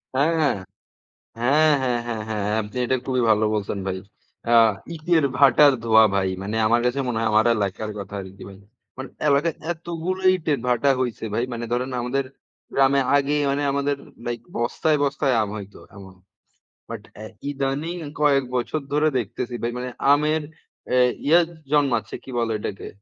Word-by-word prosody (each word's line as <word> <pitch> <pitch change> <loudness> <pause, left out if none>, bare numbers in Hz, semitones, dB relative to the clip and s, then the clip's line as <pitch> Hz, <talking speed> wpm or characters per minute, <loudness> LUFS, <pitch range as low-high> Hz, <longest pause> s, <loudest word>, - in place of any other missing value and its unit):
হ্যাঁ। 140 +4 +3 1.1
হ্যাঁ, 150 +6 +4
হ্যাঁ, 125 -2 0
হ্যাঁ, 115 -2 -3
হ্যাঁ, 105 -2 -2
আপনি 105 +4 -8
এটা 130 - +1
খুবই 130 -2 0
ভালো 110 0 +4
বলছেন 100 -1 -3
ভাই। 95 0 -2 0.5
আ - - +5 0.4
ইটের 160 -1 +2
ভাটার 140 +1 +6
ধোয়া 110 -1 +6
ভাই। 95 -1 +1
মানে 105 +3 -4
আমার 120 +1 +3
কাছে 125 +3 0
মনে 120 -3 -1
হয়, 115 -1 +1
আমার 110 +2 +4
এলাকার 105 +1 -2
কথা 100 +1 -7
আরকি 95 +1 -11
ভাই। 95 - -12 0.4
মানে 130 0 -6 0.2
এলাকায় 145 +3 +2 0.2
এতগুলো 175 +2 -4
ইটের 155 -6 -1
ভাটা 125 +3 +2
হইছে 120 -3 -2
ভাই। 115 - 0
মানে 120 0 -4
ধরেন 125 +2 -1
আমাদের 130 +3 -1 0.5
গ্রামে 135 0 +4
আগেই 145 +1 +1
মানে 140 +1 -1
আমাদের 140 0 0 0.3
লাইক 120 -1 -3 0.2
বস্তায়, 150 +6 +1
বস্তায় 140 -1 +1
আম 105 - -2
হয়তো, 100 -1 -10 0.2
এমন। 95 -1 -12 0.8
বাট - - -6
অ্যা 110 - -8 0.2
ইদানীং 140 +5 -2 0.2
কয়েক 140 -2 +3
বছর 125 +6 -1
ধরে 150 +1 +3
দেখতেছি 120 +2 -4
ভাই 120 +1 -1
মানে, 125 +1 -4 0.2
আমের 150 +2 +2 0.5
অ্যা 125 - +2 0.3
ইয়া 165 +4 +6 0.3
জন্মাচ্ছে। 145 -4 +1
কি - - -9
বলে 115 -1 0
ওইটাকে? 105 -1 -6
125 Hz, 160 wpm, -23 LUFS, 110-145 Hz, 1.1 s, ভাটার